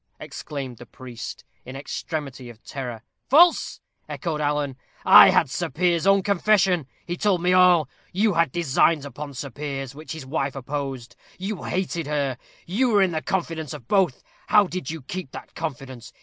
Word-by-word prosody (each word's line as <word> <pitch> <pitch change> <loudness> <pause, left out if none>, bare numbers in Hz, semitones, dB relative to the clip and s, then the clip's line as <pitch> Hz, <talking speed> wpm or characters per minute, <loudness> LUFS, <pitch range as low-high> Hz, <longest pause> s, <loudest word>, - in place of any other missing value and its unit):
exclaimed 135 -5 -7
the 120 - -11
priest, 120 -2 -9 0.2
in 130 - -9
extremity 140 -2 -5
of 115 -1 -14
terror. 125 -5 -6 0.3
"False!" 335 +5 +4 0.3
echoed 160 -4 -3
Alan. 145 -2 -1 0.3
"I - - +10
had - - +3
Sir - - -3
Piers's 170 +4 +1
own 195 -1 +5
confession. 195 -5 +2 0.2
He 175 - -3
told 195 -1 +1
me 180 +1 +2
all. 180 -4 +5 0.2
You 205 +2 +2
had 165 -5 +2
designs 160 -1 +2
upon 145 0 -8
Sir 140 +2 -6
Piers, 135 -1 -5
which 155 +3 -8
his 160 -4 -8
wife 135 -1 -2
opposed; 135 -3 -5 0.2
you 195 +1 -4
hated 175 -4 -2
her; 140 -4 -1 0.3
you 235 +9 +1
were 205 -3 +4
in 185 - +1
the 160 -1 -2
confidence 165 -6 -3
of 125 -6 -12
both 190 -9 +1 0.2
how 210 -1 +5
did 180 -7 -5
you 160 -3 -6
keep 180 +2 -6
that - - -10
confidence? 130 -6 -6
155 Hz, 170 wpm, -24 LUFS, 135-180 Hz, 0.3 s, I